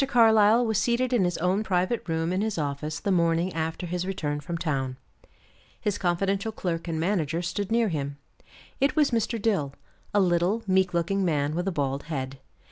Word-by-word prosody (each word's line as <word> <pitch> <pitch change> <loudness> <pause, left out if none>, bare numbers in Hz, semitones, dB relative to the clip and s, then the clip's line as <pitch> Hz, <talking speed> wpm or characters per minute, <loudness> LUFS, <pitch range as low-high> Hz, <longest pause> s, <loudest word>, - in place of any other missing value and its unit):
Carlyle 225 -2 +5
was 220 -2 +1
seated 245 +3 +1
in 215 -7 +3
his 175 -1 -1
own 180 +4 +1
private 185 +1 -1
room 165 +2 0
in 185 - 0
his 215 -3 -1
office 150 0 -3
the 200 - -1
morning 170 0 +2
after 160 +2 -3
his 175 +1 -2
return 155 -6 -2
from 170 +4 -4
town. 135 -6 -2 0.8
His 205 -3 -1
confidential 195 +4 0
clerk 175 -5 -3
and 160 -2 -2
manager 170 -2 0
stood 190 +4 -3
near 230 -1 +3
him. 140 -3 -3 0.6
It 275 - +2
was 300 -4 +3
Mr. 230 0 0
Dill, 190 -11 0 0.4
a 205 - +3
little, 180 +4 +2
meek 190 -2 +2
looking 190 +4 +1
man 150 -4 +1
with 175 +3 -2
a - - +1
bald 140 -4 -1
head. 135 -4 -4
180 Hz, 185 wpm, -26 LUFS, 160-205 Hz, 0.8 s, Carlyle